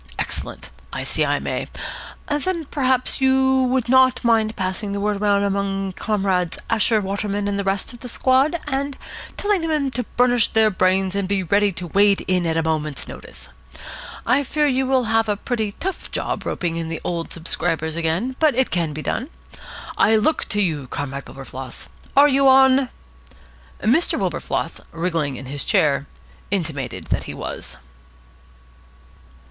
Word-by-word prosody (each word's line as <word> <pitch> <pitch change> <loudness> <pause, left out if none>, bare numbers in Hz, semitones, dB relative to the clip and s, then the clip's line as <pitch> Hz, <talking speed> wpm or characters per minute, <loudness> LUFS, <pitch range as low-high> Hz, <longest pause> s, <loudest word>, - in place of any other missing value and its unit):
Excellent. - - -5 0.2
I - - -4
see - - 0
I - - +1
may. - - -3 0.6
Then 320 +3 -1
perhaps 260 -2 +1
you 265 0 +4
would 255 -1 0
not 260 0 +4
mind 225 -2 +2
passing 195 +1 -2
the 200 - -2
word 205 0 -1
round 200 -1 +3
among 195 -1 -1
Comrades 190 -4 0
Asher, 225 0 +3
Waterman, 200 +1 -2
and 200 0 -1
the - - 0
rest 195 +4 -1
of 240 - -12
the 250 - -8
squad, 270 +8 +2
and 280 -1 -2 0.4
telling 410 -3 +1
them 300 -4 0
to 250 - -1 0.2
burnish 245 -2 +4
their 220 -1 +3
brains 185 0 +2
and 200 -1 -1
be 195 -1 0
ready 200 +3 +3
to 175 +1 -6
wade 200 +3 +3
in 180 -2 +1
at 160 0 0
a 165 - +2
moment's 155 -2 -2
notice. 60 - -11 0.8
I 250 +4 +3
fear 300 +2 0
you 265 -2 +1
will 260 -1 +3
have 225 -1 +1
a 205 - +1
pretty 220 -2 -2
tough 380 - -5
job - - -3
roping 170 -2 -2
in 165 -1 -3
the 165 - -3
old 170 -1 -3
subscribers 160 -1 -1
again, 170 +10 -1
but 310 -4 +4
it 260 +1 +1
can 165 -4 0
be 155 +1 -5
done. 255 +6 -2 0.7
I 220 - +5
look 220 +9 +2
to 205 0 0
you, 150 -7 -2
Comrade 140 +1 -5
Wilberfloss. 135 -1 -9 0.3
Are 285 +1 +9
you 275 -1 +4
on?" 265 0 +6 0.9
Mr. 265 - +3
Wilberfloss, - - -2
wriggling 165 -5 -1
in 130 - -8
his 140 +2 -4
chair, 145 -8 +2 0.4
intimated 160 -9 -2
that - - 0
he - - -6
was. - - -6
205 Hz, 165 wpm, -22 LUFS, 170-260 Hz, 0.9 s, Are